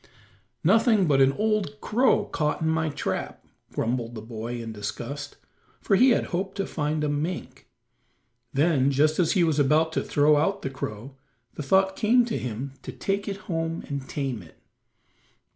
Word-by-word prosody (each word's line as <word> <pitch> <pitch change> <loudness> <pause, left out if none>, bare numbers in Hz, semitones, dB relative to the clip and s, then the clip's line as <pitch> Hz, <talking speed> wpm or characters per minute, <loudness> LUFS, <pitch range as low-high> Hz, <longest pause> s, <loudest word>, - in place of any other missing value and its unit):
"Nothing 215 +2 +4
but 140 -4 +3
an 135 0 +6
old 210 -7 -1
crow 250 +4 +2
caught 150 0 -1
in 160 - +1
my 160 0 +1
trap," 145 - -4 0.3
grumbled 120 0 -2
the 110 - -6
boy 115 +1 -5
in 115 -1 -6
disgust, 120 +7 -6 0.4
for 200 - +2
he 255 +7 +6
had 240 - +3
hoped 190 +2 -2
to 195 - -1
find 150 0 -2
a - - +1
mink. 150 +5 -4 0.8
Then, 140 -2 +3
just 150 +4 +2
as 175 - +3
he 185 - +3
was 160 -3 +1
about 155 +3 +3
to - - 0
throw 150 +1 +3
out 195 +7 0
the 135 - -3
crow, 130 +1 -6 0.4
the - - -6
thought 190 +6 +3
came 235 +3 +4
to 230 - -2
him 125 +3 -5
to - - -7
take 200 +1 -2
it 200 0 -4
home 165 -1 -2
and 140 -2 -5
tame 135 -7 -3
it. 80 - -17
150 Hz, 175 wpm, -26 LUFS, 135-190 Hz, 0.8 s, an